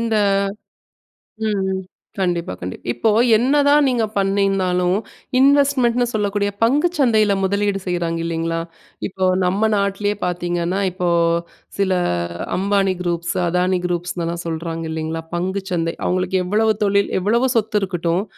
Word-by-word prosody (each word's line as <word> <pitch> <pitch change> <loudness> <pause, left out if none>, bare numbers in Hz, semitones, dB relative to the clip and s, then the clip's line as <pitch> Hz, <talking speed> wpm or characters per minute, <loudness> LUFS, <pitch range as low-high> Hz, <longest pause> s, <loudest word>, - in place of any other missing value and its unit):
இந்த 230 -1 0 1.3
ம், 210 -2 0
ம். 190 0 -3 0.4
கண்டிப்பா, 175 - -1
கண்டிப்பா. 90 +1 -7
இப்போ 120 - +1 0.3
என்னதான் 285 +4 +4
நீங்க 240 -3 +1
பண்ணிங்க 195 +1 +1
இருந்தாலும் 180 -2 +1 0.4
இன்வெஸ்ட்மென்ட்னு 265 -3 +3
சொல்லக்கூடிய 205 -1 0
பங்குச் 295 +8 +2
சந்தையில 220 -6 +3
முதலீடு 200 0 0
செய்றாங்க 170 -2 -1
இல்லேங்களா? 165 0 -2 0.5
இப்போ 190 -1 -3 0.2
நம்ம 200 +5 +2
நாட்லேயே 200 +1 0
பார்த்தீங்கன்னா, 175 +1 -1
இப்போ 180 0 -2 0.7
சில 195 -1 +2 0.6
அம்பானி 195 0 +1
குரூப்ஸ், 175 0 -2
அதானி 180 +1 +1
குரூப்ஸ்னுலாம் 175 -1 -3
சொல்றாங்க 165 0 -4
இல்லேங்களா 160 0 -3
பங்குச் 190 +2 -3
சந்தை. 165 -1 -1
அவுங்களுக்கு 185 +1 0
எவ்வளவு 215 +4 +2
தொழில் 200 0 +2
எவ்வளவு 235 +7 +2
சொத்து 215 -1 +1
இருக்கட்டும். 175 0 -1
190 Hz, 120 wpm, -20 LUFS, 175-215 Hz, 1.3 s, என்னதான்